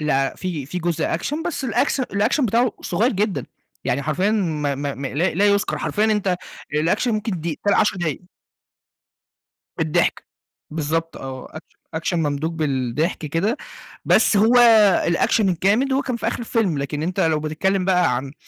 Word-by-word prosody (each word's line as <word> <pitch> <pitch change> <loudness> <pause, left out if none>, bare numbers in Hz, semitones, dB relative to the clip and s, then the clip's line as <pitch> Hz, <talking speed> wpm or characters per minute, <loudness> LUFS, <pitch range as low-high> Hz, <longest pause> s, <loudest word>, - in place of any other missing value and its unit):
لأ، 135 -3 +1
في 170 -7 -4
في 180 +6 -4
جزء 170 -2 -1
Action 295 - -3
بس 310 -6 -3
الأكس 270 +3 +1
الAction 240 +4 +1
بتاعُه 235 +2 +2
صُغيّر 230 +4 0
جدًا، 205 0 -1 0.4
يعني 135 +3 0
حرفيًا 155 +8 0
ما 155 -9 0
ما 140 0 -3
ما 135 0 -4
لا 160 +5 0
لا 200 +3 +3
يُذكر، 200 0 +1
حرفيًا 210 +1 0
أنت 205 -4 +1 0.4
الAction 165 +10 +1
ممكن 215 -6 -1
دي 160 -2 -4
تلا 205 - +4
10 205 - +2
دقايق. 165 -5 -2 1.6
بالضحك. 75 - 0 0.4
بالضبط 165 +1 -2
آه، 130 -1 -7
أكش 155 - -12 0.2
Action 165 +2 -2
ممدوج 155 0 -1
بالضحك 145 0 -1
كده، 190 - 0 0.5
بس - - +4
هو 220 +4 +4 0.5
الAction 170 +6 +2
الجامد، 200 +8 +2
هو 270 - +2
كان 255 -3 -3
في - - -4
آخر - - -3
الفيلم، 220 -9 0
لكن 140 +2 -3
أنت 175 +3 -2
لو 155 -2 +2
بتتكلم 185 +5 0
بقى 180 -8 +2
عن 135 +2 -5
175 Hz, 160 wpm, -21 LUFS, 150-210 Hz, 1.6 s, تلا